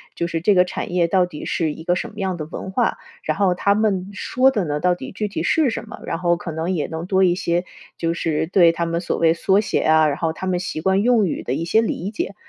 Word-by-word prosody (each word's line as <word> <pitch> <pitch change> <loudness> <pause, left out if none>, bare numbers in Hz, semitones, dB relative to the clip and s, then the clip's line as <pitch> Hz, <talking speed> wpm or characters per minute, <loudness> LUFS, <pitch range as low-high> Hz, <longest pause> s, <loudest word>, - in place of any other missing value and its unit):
就 170 - -1
是 165 -1 -3
这 200 +3 +3
个 180 0 +5
产 180 - -5
业 175 -2 +3
到 180 0 +2
底 150 -4 -8
是 160 -3 -1
一 160 - -10
个 175 +1 +1
什 - - -3
么 - - -17
样 190 -3 -2
的 155 - -5
文 190 - -6
化， 240 +2 0 0.3
然 - - -1
后 195 -3 +3
他 200 +3 +2
们 200 -3 0
说 255 +6 +2
的 210 -9 -1
呢， 150 0 -2
到 180 +1 +2
底 - - -8
具 210 +2 -3
体 165 -5 -4
是 305 - +2
什 225 0 -5
么。 - - -9
然 - - -2
后 175 0 +1
可 170 - -6
能 160 +3 -2
也 160 -5 -1
能 160 +1 -5
多 190 +1 +2
一 175 -2 +3
些 175 0 -1 0.3
就 165 0 0
是 160 -2 -1
对 175 -2 +5
他 170 0 -2
们 170 0 -1
所 175 - -2
谓 165 0 +4
缩 195 +4 +2
写 215 - -1
啊， 155 0 +4
然 145 - -1
后 160 -1 -1
他 190 - -6
们 180 -1 +1
习 165 -3 -4
惯 190 +3 +2
用 230 -5 +3
语 - - -3
的 125 - -2
一 165 +4 -2
些 220 +6 +3
理 200 -3 -2
解。 340 - -4
180 Hz, 305 characters per minute, -21 LUFS, 165-195 Hz, 0.3 s, 个